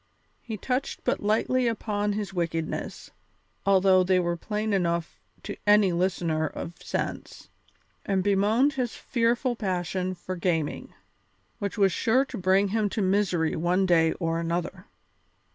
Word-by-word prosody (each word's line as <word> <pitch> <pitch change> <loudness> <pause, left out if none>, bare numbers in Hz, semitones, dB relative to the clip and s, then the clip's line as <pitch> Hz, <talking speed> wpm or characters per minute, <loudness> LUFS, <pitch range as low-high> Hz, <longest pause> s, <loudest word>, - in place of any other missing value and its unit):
He 220 -3 -6
touched 255 +6 -3
but - - 0
lightly 235 +4 +1
upon 210 -2 -1
his 205 -1 -4
wickednesses, 165 -3 -3 0.6
although 190 -1 +5
they 185 0 +3
were 175 -1 0
plain 210 +4 -2
enough 170 -3 -1 0.2
to - - -5
any 205 -2 +5
listener 170 -3 0
of 170 - -7
sense, - - -5 0.5
and 190 -2 0
bemoaned 210 +8 +3
his 250 -3 -2
fearful 240 +1 0
passion 185 -2 -2
for 185 +1 -6
gaming, 165 -4 -2 0.7
which 200 +1 -3
was 195 -2 +4
sure 250 +9 +2
to - - -7
bring 190 +2 +3
him 215 0 0
to 215 - -2
misery 185 -4 +1
one 180 +4 +1
day 165 -3 +3
or 165 -1 -2
another. 175 +3 -3
190 Hz, 140 wpm, -26 LUFS, 175-215 Hz, 0.7 s, although